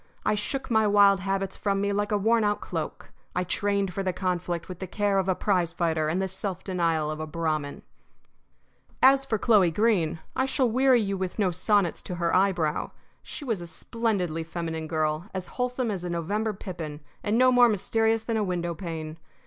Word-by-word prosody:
I - - +3
shook 245 +6 -3
my 220 -1 +4
wild 200 -1 +5
habits 195 0 -2
from 200 -1 -1
me 200 0 0
like 205 +1 -1
a 210 - +3
worn 225 +3 +3
out 205 0 +1
cloak. - - -5 0.2
I 180 - +1
trained 200 +1 0
for 195 - -2
the 190 -1 0
conflict 180 -2 -2
with 180 -2 -8
the 190 - -5
care 200 +1 +1
of 190 0 -1
a 185 - +2
prize 180 -5 0
fighter 160 -2 0
and 170 +4 0
the 190 - 0
self 190 0 -4
denial 165 -5 0
of 155 - -5
a 155 - -4
Brahmin. 155 -3 -2 1.2
As 270 +1 +6
for 225 -5 0
Chloe 205 -5 +4
Greene, 180 -4 +1 0.2
I 260 - +1
shall 265 -1 +2
weary 255 +1 +4
you 195 -1 -2
with 185 -1 -3
no 195 -4 +2
sonnets 185 0 +1
to 180 - -6
her 170 -1 0
eyebrow. 180 -5 +1 0.3
She 290 - -8
was 225 -8 -1
a 170 - -7
splendidly 180 -4 -2
feminine 160 -1 -4
girl, 155 +3 -1
as 185 -1 -3
wholesome 250 -2 -2
as 185 -3 -4
a 180 - -3
November 200 +6 -1
pippin, 170 -7 -7 0.2
and 210 +2 +1
no 255 +1 +5
more 245 -1 +6
mysterious 225 +2 +1
than 230 -1 -1
a 215 - +1
window 175 -3 -2
pane. 160 -2 -6
190 Hz, 200 wpm, -26 LUFS, 170-215 Hz, 1.2 s, As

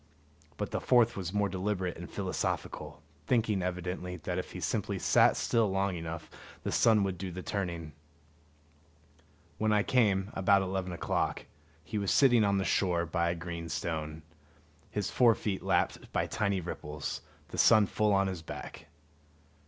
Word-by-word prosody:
But - - -3
the - - -2
fourth 120 -2 +4
was 90 -3 -4
more 105 0 +1
deliberate 95 -1 -2
and 85 +1 -8
philosophical, 95 -5 -3 0.2
thinking 110 -5 +2
evidently 90 0 -3
that 90 0 -2
if - - -6
he - - -6
simply - - -1
sat - - +4
still 115 -3 +2
long 95 0 0
enough 85 0 -6 0.4
the - - -2
sun 110 -3 +4
would 95 -3 -2
do 95 - -4
the 90 +1 -6
turning. 85 -6 -3 1.7
When 110 0 +2
I 105 -1 +3
came, 100 -6 +2
about 95 0 +3
eleven 95 -1 -2
o'clock, 85 - -1 0.4
he 105 - -3
was 100 -2 -1
sitting 120 -5 +5
on 100 -1 +2
the 95 - 0
shore 85 -1 +1
by 85 +1 0
a 85 - -1
green 85 -1 -6
stone, 80 -1 -3 0.7
his 105 -2 -2
fore 120 -3 +5
feet 100 -3 -3
lapped - - 0
by - - +1
tiny 100 -3 -1
ripples, 75 -3 -5 0.3
the - - -5
sun 110 -2 +7
full 105 +2 +1
on 100 0 +3
his 95 -3 -3
back. 80 - -8
95 Hz, 160 wpm, -31 LUFS, 85-105 Hz, 1.7 s, sun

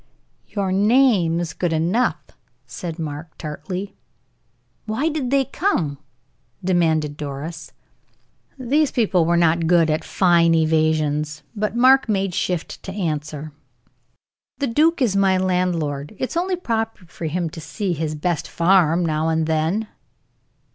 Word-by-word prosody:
"Your 195 -3 -2
name 205 -5 +3
is 175 -2 -3
good 175 -2 -1
enough," 170 +10 +1 0.5
said 170 -2 -6
Mark, 155 0 -6
tartly. 180 +6 -6 0.9
"Why 260 +9 0
did 295 -5 -2
they 275 0 +2
come?" 180 - -1 0.6
demanded 160 -5 +1
Doris. 150 +3 -6 0.9
These 275 +4 +1
people 195 -8 +2
were 170 +1 +2
not 170 -1 +2
good 165 -2 +4
at 155 - -1
fine 170 -3 +3
evasions, 155 -2 +1
but 210 +1 -2
Mark 260 +1 +5
made 195 -3 0
shift 175 -1 -3
to 190 - -7
answer: 155 -5 -4 1.1
"The 280 - -1
duke 305 +5 +2
is 210 -6 +1
my 195 -1 +3
landlord; 180 -5 -1
it 260 - -3
is - - -6
only 365 +2 0
proper 225 - -3
for 170 0 -8
him 170 +2 -1
to 160 - -8
see 180 +5 -3
his 155 -1 -3
best 165 +1 -2
farm 175 -1 +3
now 155 0 0
and 160 0 +1
then." 160 +7 0
175 Hz, 135 wpm, -21 LUFS, 160-210 Hz, 1.1 s, Mark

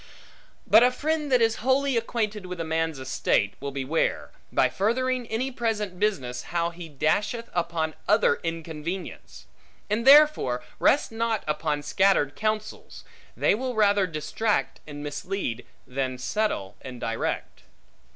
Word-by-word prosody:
But 220 - +7
a 250 - +6
friend 300 +3 -2
that 250 -2 +5
is 225 0 +2
wholly 265 +2 +1
acquainted 215 -4 -2
with 180 -1 -6
a - - -1
man's 160 -1 -1
estate, 130 -5 0
will 140 - -4
beware, 140 +3 -1 0.2
by - - +3
furthering 250 +4 0
any 245 +5 -2
present 215 -6 -2
business, 130 -13 -1
how 170 0 -1
he 170 -1 -9
dasheth 205 - -1
upon 170 -2 -1
other 210 +2 +3
inconvenience. 165 +2 -6 0.5
And 220 +2 +1
therefore 280 - +6 0.2
rest 285 - +3
not 225 -1 -1
upon 150 -1 -1
scattered 170 -6 +2
counsels; 215 0 -3 0.3
they - - +3
will 250 +3 -2
rather 205 -2 +3
distract 155 - -1
and 145 -1 -7
mislead, 145 - -4 0.2
than 130 0 -3
settle 125 - -2
and 125 -2 -8
direct. 115 0 -3
190 Hz, 135 wpm, -26 LUFS, 150-225 Hz, 0.5 s, But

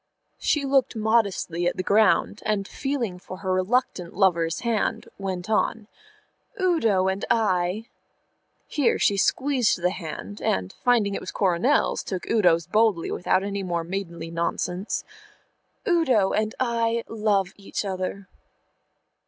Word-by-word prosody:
She 295 -2 +1
looked 270 -3 +2
modestly 205 -6 +1
at - - -1
the 185 - -1
ground, 210 +1 +3
and, 205 -2 -1
feeling 245 -10 -3
for 185 +1 -9
her 185 -1 -2
reluctant 185 -2 0
lover's 170 -4 +2
hand, 230 -3 -1
went 185 -2 -4
on, 220 0 0 0.7
"Udo 230 - +2
and 190 +1 -1
I" 195 -2 +1 0.8
here 290 -5 +1
she 200 - +3
squeezed 255 +1 +2
the 180 +1 +1
hand, 185 +4 -7
and, 95 0 -1
finding 230 -5 +3
it - - -3
was - - -6
Coronel's, 190 +9 +2
took 185 -3 -5
Udo's 175 -7 +3
boldly 210 -2 +2
without 185 +1 +1
any 200 0 -3
more 175 -3 -2
maidenly 170 -2 -5
nonsense 175 +3 -2 0.8
"Udo 265 - +3
and 215 0 0
I 230 -2 0
love 205 -4 0
each 200 +1 -5
other." 190 +1 -4
200 Hz, 130 wpm, -25 LUFS, 180-230 Hz, 0.8 s, ground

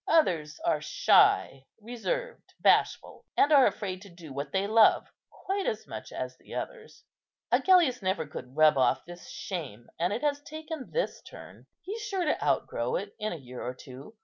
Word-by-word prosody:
Others 170 - +2
are 340 - +1
shy, 405 - +3
reserved, 470 - -5
bashful, - - +2
and 290 - +4
are 275 -3 +7
afraid 185 -3 -4
to 200 - -12
do 170 -5 -12
what 140 +1 -5
they 195 +1 0
love 220 +1 +5 0.2
quite 390 +2 -3
as 475 - -2
much - - -8
as - - -5
the - - -11
others. 455 -2 -7 0.5
Agellius 345 - +4
never 190 -4 -1
could 130 -2 -9
rub 155 -3 +5
off 130 - +2
this 175 0 -11
shame, 140 - -6
and 175 +3 +1
it 225 +7 -3
has 290 -1 0
taken 310 -1 -7
this - - -2
turn. - - -13 0.2
He's 415 +6 -5
sure 390 -4 -2
to 305 - 0
outgrow 475 - 0
it - - -4
in 215 0 -2
a - - -3
year 125 -3 -10
or 125 +1 -4
two. 135 - -12
215 Hz, 175 wpm, -29 LUFS, -, 0.5 s, are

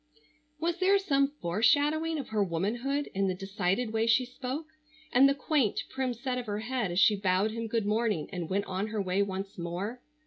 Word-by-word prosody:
Was 340 +2 -1
there 385 +2 +5
some 280 -8 +2
foreshadowing 290 - +1
of 275 - -5
her 215 -2 +1
womanhood 235 - -1
in 195 0 +1
the 185 - 0
decided 195 +4 -1
way 225 0 +1
she 240 +3 +4
spoke, 260 +4 -5 0.5
and 270 +3 +6
the 275 - +1
quaint, 280 -6 +1
prim 260 -2 -2
set 250 +1 -2
of 245 - -7
her 205 0 -2
head 240 -3 -1
as 175 +1 0
she 210 +2 +6
bowed 195 +1 +1
him 230 0 -4
good 225 -1 -1
morning 210 -6 0
and 175 -3 -4
went 200 +2 0
on 190 +3 -2
her 220 0 -3
way 190 0 +1
once 195 0 -4
more? 185 +8 -4
225 Hz, 200 wpm, -29 LUFS, 195-265 Hz, 0.5 s, and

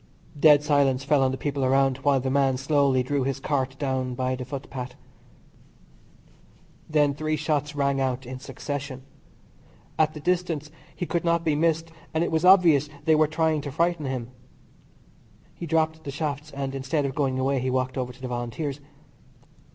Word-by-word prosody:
Dead 150 -1 +7
silence 140 -3 +2
fell 145 0 +3
on 130 - +3
the 130 - -3
people 140 -1 -2
around 135 0 +3
while 140 0 +2
the 130 +1 -2
man 135 -1 +2
slowly 140 -1 +2
drew 140 +2 -1
his 135 +1 -2
cart 135 -2 -1
down 130 -3 -2
by 130 0 -1
the 130 - -5
footpath. 130 -1 -6 1.9
Then 150 -2 +3
three 155 +2 -1
shots 150 -1 -1
rang 140 -1 +1
out 130 -1 -1
in 130 +1 -7
succession. 140 -1 -6 1.0
At 155 0 +2
the - - -6
distance 165 -3 -1 0.2
he 180 - -3
could 170 0 -1
not 170 0 +1
be 155 - +2
missed, 165 +1 +1 0.2
and 160 - +2
it - - -2
was 160 +1 +1
obvious 170 -6 +6 0.2
they 160 - +5
were 155 0 +4
trying 155 0 +1
to 145 - -6
frighten 170 0 0
him. 125 -2 -4 1.2
He 170 - -7
dropped 160 0 0
the 145 - -6
shafts, 150 +1 -3
and 140 -2 -4
instead 135 +2 -1
of 135 - -2
going 135 -2 0
away 135 +1 +1
he 130 +1 -1
walked 130 0 -1
over 125 -2 -2
to 130 +1 -17
the - - -2
Volunteers. 125 +4 -4
140 Hz, 175 wpm, -25 LUFS, 130-155 Hz, 1.9 s, Dead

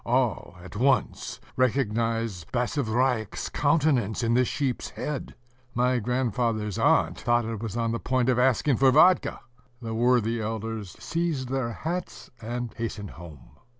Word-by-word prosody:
All, 120 -6 0
at 90 - -11
once, 130 +4 +1 0.2
recognized 115 - 0
Basavriuk's 125 -3 0
countenance 130 -8 +1
in 115 0 +2
the 125 +1 +4
sheep's 130 0 -2
head: 150 -3 -5 0.4
my 125 +1 +2
grandfather's 115 -3 -1
aunt - - +3
thought 120 0 +2
it 110 -2 -4
was 115 0 -4
on 115 -1 0
the 115 - -2
point 130 -1 0
of 125 -1 +3
asking 130 +1 +3
for 135 0 +5
vodka.... 155 +7 +4 0.4
The 115 -2 -5
worthy 115 -1 +2
elders 110 -2 -4
seized 140 +1 -2
their 130 -3 -1
hats, 175 +7 -5
and 120 0 -4
hastened 110 -3 -5
home. 80 -5 -13
120 Hz, 140 wpm, -26 LUFS, 110-130 Hz, 0.4 s, for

